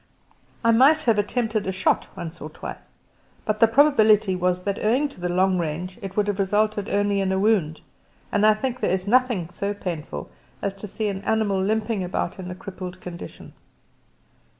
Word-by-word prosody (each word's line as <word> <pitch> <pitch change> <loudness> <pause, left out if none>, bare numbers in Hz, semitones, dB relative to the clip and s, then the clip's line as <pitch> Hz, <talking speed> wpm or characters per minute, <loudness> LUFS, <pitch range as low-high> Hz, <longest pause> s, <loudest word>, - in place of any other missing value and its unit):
I 230 - +5
might 280 +7 +5
have 230 -5 +3
attempted 215 -1 -1
a - - +1
shot 185 - +1
once 170 -2 -7
or 155 - -6
twice, - - -9 0.5
but 215 -1 -1
the 225 - +7
probability 220 -6 +4
was 180 0 0
that 200 0 -2
owing 250 +7 +2
to 185 - -15
the 180 - -1
long 185 +1 +2
range 175 +5 -4
it 195 0 -7
would 210 - +3
have 205 -1 -2
resulted 205 +1 +1
only 205 0 +1
in 190 -1 0
a 190 - +1
wound, 190 -7 +1 0.5
and 205 - +1
I 215 0 +6
think 250 +2 -3
there - - 0
is 185 0 0
nothing 235 -7 +2
so 200 +3 -3
painful 155 - -5 0.3
as 200 - -2
to 210 - -7
see 215 +2 -3
an 195 -1 -4
animal 205 -2 +1
limping 215 0 0
about 180 0 -3
in 180 -1 -6
a 180 - -5
crippled 185 -1 -8
condition. 175 -2 -9
200 Hz, 190 wpm, -24 LUFS, 185-220 Hz, 0.5 s, the